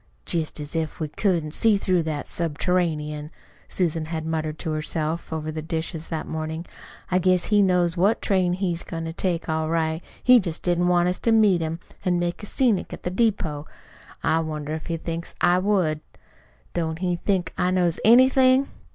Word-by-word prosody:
"Jest 160 Hz, -2 st, -2 dB
as 150 Hz, +2 st, -6 dB
if 160 Hz, 0 st, -2 dB
we 155 Hz, -2 st, -2 dB
couldn't 165 Hz, -2 st, 0 dB
see 220 Hz, +1 st, +3 dB
through 185 Hz, -3 st, +1 dB
that 155 Hz, -2 st, -3 dB
subterranean!" 155 Hz, -2 st, -1 dB, 0.4 s
Susan 165 Hz, -3 st, -1 dB
had 160 Hz, 0 st, -4 dB
muttered 155 Hz, -1 st, -2 dB
to 160 Hz, -, -3 dB
herself 155 Hz, +1 st, -3 dB
over 155 Hz, -1 st, -3 dB
the 155 Hz, 0 st, -4 dB
dishes 160 Hz, 0 st, -3 dB
that 160 Hz, -2 st, -3 dB
morning. 160 Hz, +1 st, -4 dB, 0.5 s
"I 185 Hz, -, +3 dB
guess 185 Hz, -1 st, +3 dB
he 210 Hz, -1 st, +3 dB
knows 180 Hz, -3 st, +2 dB
what 200 Hz, +6 st, +2 dB
train 185 Hz, -3 st, +1 dB
he's 180 Hz, -2 st, -1 dB
goin' 165 Hz, -1 st, -5 dB
to 165 Hz, -, -5 dB
take 175 Hz, -1 st, -2 dB
all 160 Hz, -1 st, -1 dB
right. 160 Hz, 0 st, 0 dB, 0.2 s
He 250 Hz, -1 st, +7 dB
jest 170 Hz, -5 st, -4 dB
didn't 175 Hz, 0 st, +2 dB
want 175 Hz, 0 st, +3 dB
us 180 Hz, -, -2 dB
to 230 Hz, -, +2 dB
meet 210 Hz, -6 st, +4 dB
him 160 Hz, +1 st, -3 dB, 0.2 s
an' 180 Hz, -2 st, +2 dB
make 175 Hz, +2 st, -2 dB
a 205 Hz, -, -6 dB
scenic 235 Hz, -6 st, +1 dB
at -, -, -9 dB
the 180 Hz, -, -2 dB
depot. 180 Hz, -9 st, 0 dB, 0.6 s
I 160 Hz, -, +2 dB
wonder 155 Hz, -2 st, -4 dB
if 160 Hz, -, -5 dB
he 170 Hz, -2 st, -2 dB
thinks 165 Hz, +1 st, -5 dB
I 175 Hz, +1 st, +4 dB
would! 185 Hz, -6 st, +1 dB, 0.7 s
Don't 160 Hz, -2 st, -2 dB
he 180 Hz, 0 st, -1 dB
think 185 Hz, 0 st, -1 dB
I 180 Hz, -, +1 dB
knows 180 Hz, -2 st, +1 dB
anything?" 260 Hz, +3 st, +5 dB
170 Hz, 185 wpm, -24 LUFS, 160-185 Hz, 0.7 s, He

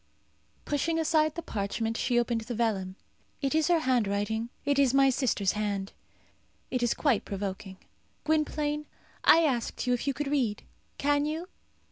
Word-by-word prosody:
Pushing 310 Hz, +3 st, 0 dB
aside 310 Hz, -1 st, +2 dB
the 335 Hz, -, -5 dB
parchment, 225 Hz, +2 st, -2 dB
she 240 Hz, +1 st, +1 dB
opened 235 Hz, -1 st, 0 dB
the 240 Hz, +2 st, -5 dB
vellum. 200 Hz, -5 st, -1 dB, 0.4 s
"It 275 Hz, -1 st, -1 dB
is 315 Hz, 0 st, +2 dB
her 350 Hz, -1 st, +4 dB
handwriting. 220 Hz, -3 st, 0 dB, 0.2 s
It 285 Hz, -1 st, +2 dB
is 270 Hz, -2 st, +4 dB
my 270 Hz, 0 st, +5 dB
sister's 235 Hz, -7 st, +1 dB
hand. 205 Hz, -2 st, -3 dB, 0.8 s
It 255 Hz, -, 0 dB
is 240 Hz, -1 st, +1 dB
quite 270 Hz, -9 st, +2 dB
provoking. 195 Hz, -1 st, -5 dB, 0.5 s
Gwynplaine, 300 Hz, -1 st, 0 dB, 0.4 s
I 330 Hz, -, +7 dB
asked 255 Hz, -7 st, -1 dB
you 250 Hz, -, +2 dB
if 245 Hz, -, -2 dB
you 275 Hz, -, +1 dB
could 295 Hz, -, -2 dB
read. 250 Hz, -8 st, 0 dB, 0.3 s
Can 290 Hz, +1 st, +2 dB
you?" 325 Hz, +4 st, -4 dB
255 Hz, 155 wpm, -29 LUFS, 215-295 Hz, 0.8 s, I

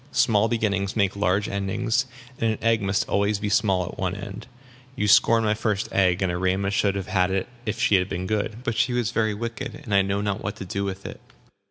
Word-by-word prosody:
"Small 110 Hz, -1 st, +3 dB
beginnings 100 Hz, -4 st, -1 dB
make 100 Hz, -3 st, +1 dB
large 100 Hz, 0 st, +1 dB
endings; 110 Hz, +6 st, -1 dB, 0.3 s
and 115 Hz, -1 st, +1 dB
an -, -, -6 dB
egg 115 Hz, -1 st, +3 dB
must 95 Hz, 0 st, 0 dB
be -, -, -13 dB
always 100 Hz, +1 st, +1 dB
small 95 Hz, -5 st, +2 dB
at -, -, -9 dB
one 95 Hz, 0 st, -1 dB
end. 100 Hz, +1 st, -8 dB, 0.5 s
You 105 Hz, -, 0 dB
scorn 115 Hz, +3 st, +5 dB
my 105 Hz, -1 st, +2 dB
first 105 Hz, -2 st, -1 dB
egg, 95 Hz, -1 st, +2 dB
and 90 Hz, -, +1 dB
Erema 95 Hz, +2 st, 0 dB
should 100 Hz, -1 st, +1 dB
have 100 Hz, -2 st, -3 dB
had 95 Hz, -1 st, +1 dB
it 95 Hz, 0 st, -1 dB, 0.2 s
if 105 Hz, -, -2 dB
she -, -, +2 dB
had 90 Hz, +1 st, -1 dB
been 90 Hz, +1 st, -3 dB
good. 110 Hz, +3 st, -2 dB
But 120 Hz, -3 st, -1 dB
she 125 Hz, -, +1 dB
was 120 Hz, -2 st, 0 dB
very 110 Hz, -3 st, 0 dB
wicked, 115 Hz, +4 st, -5 dB
and 105 Hz, -, -4 dB
I 100 Hz, -, +6 dB
know 100 Hz, +1 st, -1 dB
not 100 Hz, -1 st, -2 dB
what 105 Hz, -, -3 dB
to 95 Hz, -, -7 dB
do 100 Hz, +2 st, -3 dB
with 100 Hz, 0 st, -5 dB
it." -, -, -8 dB
100 Hz, 230 wpm, -24 LUFS, 95-110 Hz, 0.5 s, I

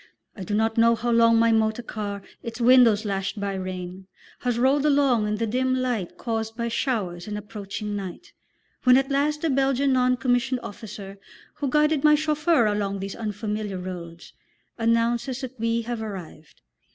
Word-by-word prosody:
I 195 Hz, -, -7 dB
do 205 Hz, +3 st, -2 dB
not 225 Hz, +1 st, +1 dB
know 230 Hz, 0 st, +5 dB
how 240 Hz, +2 st, -2 dB
long 230 Hz, 0 st, +5 dB
my 230 Hz, 0 st, +4 dB
motor 220 Hz, +1 st, +1 dB
car, 205 Hz, -3 st, -5 dB, 0.2 s
its 230 Hz, 0 st, -7 dB
windows 235 Hz, -3 st, +5 dB
lashed 195 Hz, +1 st, -2 dB
by 200 Hz, -1 st, -2 dB
rain, 185 Hz, 0 st, -6 dB, 0.3 s
has 245 Hz, -2 st, -1 dB
rolled 265 Hz, +3 st, +3 dB
along 275 Hz, -7 st, +3 dB
in 210 Hz, -, 0 dB
the 230 Hz, +2 st, -1 dB
dim 255 Hz, +3 st, 0 dB
light 245 Hz, -8 st, -2 dB
caused 225 Hz, -1 st, -3 dB
by 235 Hz, -1 st, -1 dB
showers 200 Hz, -8 st, -2 dB
and 210 Hz, 0 st, -4 dB
approaching 210 Hz, 0 st, -6 dB
night, 195 Hz, -, -7 dB, 0.5 s
when 250 Hz, 0 st, +6 dB
at 270 Hz, +1 st, 0 dB
last 295 Hz, +2 st, 0 dB
the 325 Hz, -, +2 dB
Belgian 270 Hz, 0 st, +2 dB
non 255 Hz, 0 st, +3 dB
commissioned 245 Hz, +1 st, 0 dB
officer, 200 Hz, -1 st, -9 dB, 0.3 s
who 285 Hz, -2 st, -3 dB
guided 300 Hz, +1 st, +2 dB
my 300 Hz, 0 st, +7 dB
chauffeur 305 Hz, -2 st, +2 dB
along 205 Hz, -1 st, -1 dB
these 195 Hz, 0 st, -5 dB
unfamiliar 210 Hz, -2 st, -4 dB
roads, 175 Hz, -2 st, -8 dB, 0.4 s
announces 235 Hz, +3 st, 0 dB
that 260 Hz, -2 st, -7 dB
we 230 Hz, +1 st, 0 dB
have 235 Hz, -1 st, -4 dB
arrived. 185 Hz, -7 st, -9 dB
230 Hz, 170 wpm, -25 LUFS, 205-255 Hz, 0.5 s, my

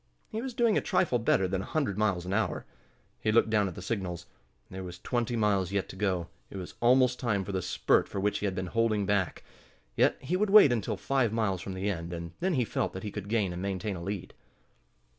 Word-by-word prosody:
He 220 Hz, 0 st, -3 dB
was 255 Hz, -1 st, -5 dB
doing 235 Hz, -4 st, +3 dB
a -, -, -6 dB
trifle 180 Hz, -10 st, +1 dB
better 95 Hz, -4 st, +2 dB
than 95 Hz, 0 st, -1 dB
a -, -, -6 dB
hundred 140 Hz, -11 st, -1 dB
miles 100 Hz, -4 st, 0 dB
an 95 Hz, -, -3 dB
hour. 105 Hz, -3 st, 0 dB, 0.5 s
He 110 Hz, -, +1 dB
looked 110 Hz, 0 st, +3 dB
down 105 Hz, -2 st, +3 dB
at 90 Hz, -, -6 dB
the 90 Hz, -, -8 dB
signals. 95 Hz, -5 st, -3 dB, 0.5 s
There 95 Hz, 0 st, -6 dB
was 90 Hz, -1 st, -7 dB
twenty 120 Hz, +5 st, -1 dB
miles 100 Hz, -4 st, +1 dB
yet 100 Hz, -1 st, -1 dB
to -, -, -8 dB
go. 95 Hz, -4 st, -1 dB, 0.2 s
It -, -, -8 dB
was 90 Hz, -2 st, -7 dB
almost 125 Hz, +1 st, +4 dB
time 105 Hz, -6 st, 0 dB
for 100 Hz, -, -4 dB
the 95 Hz, -1 st, -1 dB
spurt 90 Hz, +1 st, +2 dB
for -, -, -3 dB
which 105 Hz, +1 st, 0 dB
he 105 Hz, -, -1 dB
had 95 Hz, -, -2 dB
been 95 Hz, -, -2 dB
holding 110 Hz, -3 st, +2 dB
back. 100 Hz, -4 st, 0 dB, 0.5 s
Yet -, -, +3 dB
he 155 Hz, +8 st, -2 dB
would 205 Hz, +2 st, +1 dB
wait 200 Hz, -9 st, +8 dB
until 110 Hz, -4 st, -1 dB
five 120 Hz, +2 st, +1 dB
miles 105 Hz, -5 st, 0 dB
from 95 Hz, 0 st, -6 dB
the 95 Hz, +2 st, -2 dB
end, 85 Hz, -3 st, -3 dB
and 85 Hz, 0 st, -5 dB
then 185 Hz, -1 st, +1 dB
he 125 Hz, -3 st, +2 dB
felt -, -, -2 dB
that 95 Hz, -, -6 dB
he 105 Hz, -, -4 dB
could 100 Hz, -1 st, -6 dB
gain 105 Hz, -5 st, +1 dB
and 90 Hz, -, -5 dB
maintain 100 Hz, +1 st, -2 dB
a 85 Hz, -, -7 dB
lead. 95 Hz, +1 st, -5 dB
100 Hz, 240 wpm, -29 LUFS, 95-120 Hz, 0.5 s, wait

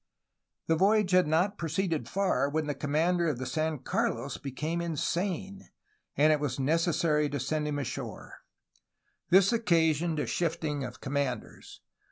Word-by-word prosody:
The 165 Hz, -, +2 dB
voyage 200 Hz, +2 st, +3 dB
had 180 Hz, -2 st, +4 dB
not 180 Hz, +7 st, +1 dB
proceeded 160 Hz, -4 st, -1 dB
far 185 Hz, -8 st, +1 dB
when 155 Hz, +1 st, -1 dB
the 145 Hz, -, -2 dB
commander 165 Hz, +5 st, +1 dB
of 145 Hz, -, -2 dB
the 130 Hz, -, -4 dB
San 155 Hz, +3 st, -1 dB
Carlos 130 Hz, 0 st, -2 dB
became 155 Hz, +5 st, -3 dB
insane, 180 Hz, +4 st, -3 dB, 0.5 s
and 155 Hz, +2 st, +5 dB
it 150 Hz, -, 0 dB
was 140 Hz, -3 st, -2 dB
necessary 155 Hz, +1 st, +1 dB
to 145 Hz, 0 st, -3 dB
send 150 Hz, +4 st, -1 dB
him 145 Hz, -1 st, -2 dB
ashore. 140 Hz, -4 st, -6 dB, 0.9 s
This 190 Hz, +4 st, +5 dB
occasioned 165 Hz, -6 st, +2 dB
a -, -, 0 dB
shifting 160 Hz, -4 st, -2 dB
of 125 Hz, 0 st, -8 dB
commanders. 135 Hz, -4 st, -4 dB
155 Hz, 145 wpm, -29 LUFS, 145-175 Hz, 0.9 s, and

